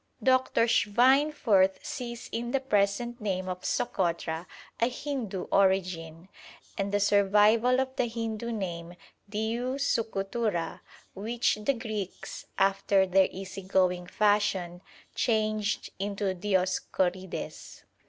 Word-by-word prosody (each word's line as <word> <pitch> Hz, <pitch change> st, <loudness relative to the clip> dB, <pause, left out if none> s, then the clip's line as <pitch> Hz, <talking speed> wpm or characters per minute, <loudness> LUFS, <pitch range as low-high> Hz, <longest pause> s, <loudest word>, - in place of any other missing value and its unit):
Dr. 260 Hz, -2 st, +3 dB
Schweinfurth 235 Hz, -4 st, +3 dB
sees 240 Hz, -3 st, -5 dB
in 235 Hz, +1 st, -3 dB
the 275 Hz, -, +1 dB
present 235 Hz, 0 st, 0 dB
name 185 Hz, -3 st, -2 dB
of 180 Hz, 0 st, -4 dB
Sokotra 170 Hz, -2 st, -1 dB, 0.3 s
a 235 Hz, -, +3 dB
Hindoo 250 Hz, -8 st, -4 dB
origin, 180 Hz, -4 st, +1 dB, 0.5 s
and 200 Hz, 0 st, -2 dB
the 205 Hz, -, +2 dB
survival 210 Hz, +5 st, +4 dB
of 265 Hz, 0 st, -2 dB
the 245 Hz, -, +1 dB
Hindoo 230 Hz, 0 st, -3 dB
name 175 Hz, -5 st, -5 dB, 0.3 s
Diu 230 Hz, +5 st, -2 dB
Sukutura, 215 Hz, -8 st, -1 dB, 0.3 s
which 230 Hz, +5 st, 0 dB
the 270 Hz, +6 st, +1 dB
Greeks, 215 Hz, -5 st, -6 dB
after 195 Hz, 0 st, +3 dB
their 190 Hz, 0 st, +4 dB
easy 190 Hz, +1 st, -7 dB
going 185 Hz, -2 st, +1 dB
fashion, 195 Hz, -4 st, +1 dB, 0.3 s
changed 215 Hz, -2 st, 0 dB
into 200 Hz, -1 st, -1 dB
Dioscorides. 185 Hz, -1 st, -2 dB
205 Hz, 105 wpm, -28 LUFS, 190-235 Hz, 0.5 s, survival